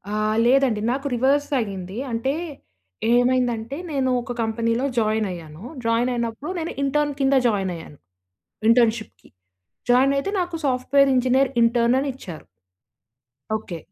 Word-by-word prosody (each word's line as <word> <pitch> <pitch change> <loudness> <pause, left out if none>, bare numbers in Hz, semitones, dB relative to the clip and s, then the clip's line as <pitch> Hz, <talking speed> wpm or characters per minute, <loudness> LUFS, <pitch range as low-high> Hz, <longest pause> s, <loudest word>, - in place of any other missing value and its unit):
ఆహ్, 215 0 0
లేదండి 250 -4 +3
నాకు 275 +2 -2
రివర్స్ 275 +4 +2
అయింది 195 -2 -5
అంటే 230 +5 -1 0.8
ఏమైందంటే 245 0 +1
నేను 265 -2 0
ఒక 245 - -7
కంపెనీలో 230 +3 0
జాయినయ్యాను. 190 -6 -2 0.2
జాయినయినప్పుడు 235 +4 -1
నేను 325 - -3
ఇంటర్న్ 290 +1 +1
కింద 270 0 +3
జాయినయ్యాను 180 -8 -3 0.7
ఇంటర్న్‌షిప్‌కి. 230 -2 +1 0.6
జాయినయితే 275 +8 +3
నాకు 350 -1 -2
సాఫ్ట్‌వేర్ 270 +2 +3
ఇంజినీర్ 255 +1 +3
ఇంటర్న్ 235 +2 +3
అనిచ్చారు. 260 - -6 1.1
ఓకే. 180 -5 -8
245 Hz, 105 wpm, -23 LUFS, 220-270 Hz, 1.1 s, లేదండి